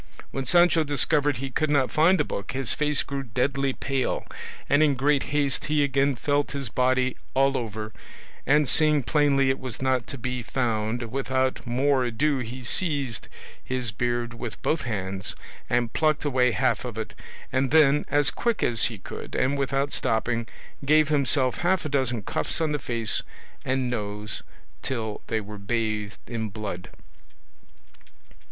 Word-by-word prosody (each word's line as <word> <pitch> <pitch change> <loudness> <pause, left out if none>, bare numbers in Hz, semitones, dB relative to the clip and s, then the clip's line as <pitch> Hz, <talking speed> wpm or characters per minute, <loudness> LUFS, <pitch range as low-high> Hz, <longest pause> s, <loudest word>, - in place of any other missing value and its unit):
When 135 -1 -3
Sancho 175 0 +5
discovered 145 -1 +2
he 135 +2 -5
could 155 +4 0
not 140 -3 +2
find 170 +5 +4
the - - +4
book 100 - -5
his 135 -1 0
face 150 -1 +2
grew 140 0 -4
deadly 135 +3 0
pale, 135 -1 -2 0.4
and 145 +2 +4
in 150 -3 +4
great 140 +2 +2
haste 145 -2 0
he 150 -1 +2
again 140 0 +2
felt 145 +4 0
his 140 -4 -3
body 130 +1 +1 0.2
all 135 +1 +3
over, 110 -3 -4 0.5
and 150 0 +4
seeing 150 0 +4
plainly 140 -1 +3
it 130 - -3
was 130 -3 -6
not 130 -2 0
to 140 - -6
be 125 +1 -3
found, 115 -1 -2
without 130 -1 -1
more 130 +2 +2
ado 135 +4 0
he 125 +1 -6
seized 140 - 0 0.4
his 130 -3 -2
beard 120 +2 -2
with 115 -1 -7
both 155 -3 0
hands 95 -4 -3 0.3
and 120 -2 +1
plucked 155 -1 +1
away 130 -3 +3
half - - +1
of - - -6
it, - - -5 0.4
and 130 0 +1
then, 150 -1 +5
as 145 -1 +3
quick 235 -2 -1
as 115 -5 +4
he - - -1
could - - -8
and 130 +2 +1
without 140 0 -1
stopping, 115 +1 0 0.4
gave 155 +2 +4
himself 140 -3 +1
half 175 0 +1
a - - -2
dozen 125 -6 0
cuffs - - -1
on 160 -2 0
the 150 - -1
face 115 -3 +2 0.4
and 130 -1 0
nose 105 -2 -4 0.4
till 110 -5 -3
they 110 - 0
were 105 0 -8
bathed 110 0 -2
in 110 -3 -4
blood. 100 -3 -6
130 Hz, 160 wpm, -25 LUFS, 115-145 Hz, 0.5 s, Sancho